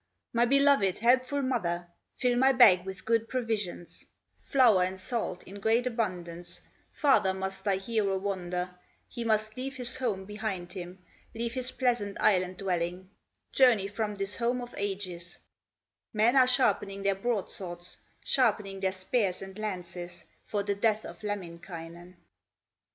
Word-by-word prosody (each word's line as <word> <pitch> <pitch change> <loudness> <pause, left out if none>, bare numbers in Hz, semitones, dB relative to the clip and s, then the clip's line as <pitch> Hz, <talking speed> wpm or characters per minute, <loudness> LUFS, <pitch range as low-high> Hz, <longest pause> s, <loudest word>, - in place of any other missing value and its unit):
My 235 +1 +4
beloved, 275 -7 +4
helpful 255 +5 +2
mother, 175 -9 -1 0.3
Fill 250 -1 +2
my 265 +2 +5
bag 190 -8 +7
with 190 +2 -7
good 225 0 +1
provisions, 220 -8 -3 0.4
Flour 240 -9 +4
and 185 +1 -1
salt 195 -2 -3
in 200 +2 -10
great 225 +4 +2
abundance, 180 -7 -3 0.3
Farther 210 -10 +3
must 190 0 -4
thy 200 -2 +2
hero 200 -1 0
wander, 180 -2 -3 0.4
He 235 - -5
must 215 -1 +1
leave 265 +1 -4
his 250 -1 -5
home 205 -7 -1
behind 205 -4 -4
him, 180 -1 -8 0.3
Leave 230 0 -2
his 255 -1 -2
pleasant 240 -7 -1
Island 185 -2 +2
dwelling, 180 0 -2 0.4
Journey 245 -7 +5
from 210 +1 -3
this 195 0 -1
home 240 +1 0
of 245 0 -7
ages; 185 -3 -3 0.8
Men 225 +4 +3
are 260 -2 +6
sharpening 205 -6 +2
their 200 0 +3
broadswords, 190 -4 -4 0.3
Sharpening 210 -6 +1
their 190 -1 0
spears 190 0 0
and 190 0 -9
lances, 175 -4 -5 0.2
For 205 -1 -2
the 200 - 0
death 215 +1 +1
of - - -9
Lemminkainen." 175 -3 -7
200 Hz, 140 wpm, -29 LUFS, 185-235 Hz, 0.8 s, bag